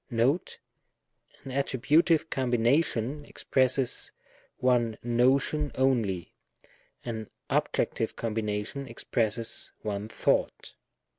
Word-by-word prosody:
Note. 130 +8 +1 0.9
An 135 - -7
attributive 150 +5 +2
combination 130 +2 +1
expresses 130 -2 0 0.5
one 120 -3 +2
notion 130 +5 +2
only, 115 -10 +1 0.7
an 110 -3 -4 0.2
objectiye - - 0
combination 110 +4 -3
expresses 115 -1 -2
one 105 0 -3
thought. - - 0
125 Hz, 75 wpm, -28 LUFS, 115-135 Hz, 0.9 s, attributive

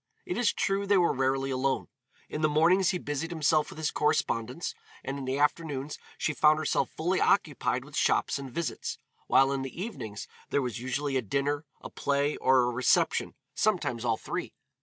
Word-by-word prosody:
It 360 - -3
is 240 -5 +2
true 200 +1 -1
they 200 0 +5
were 175 -2 +3
rarely 135 0 0
alone. 130 +1 0 0.4
In 150 - -4
the 155 - +3
mornings 170 +5 +4
he 180 - +1
busied 145 0 -3
himself 155 -2 +2
with - - -11
his 155 -1 -1
correspondence, 125 0 0 0.3
and 135 +1 -4
in 135 - -5
the 130 +1 -1
afternoons 145 -1 -1 0.2
she 155 - 0
found 150 +1 +5
herself 155 -1 0
fully 180 +4 -1
occupied 145 -8 +1
with 150 0 -11
shops 145 - +2
and 135 -2 -7
visits, 170 +4 -3 0.3
while 135 0 +5
in 135 -1 -1
the 135 +5 -6
evenings 120 - -6 0.2
there 140 - +1
was 125 -2 -3
usually 135 +2 -1
a - - +1
dinner, 140 +6 -1 0.2
a - - -8
play, 140 +1 0
or 130 -1 +4
a 120 - +1
reception, 125 +1 +2 0.2
sometimes 145 - 0
all 115 -2 +1
three. - - -5
145 Hz, 185 wpm, -29 LUFS, 130-160 Hz, 0.4 s, they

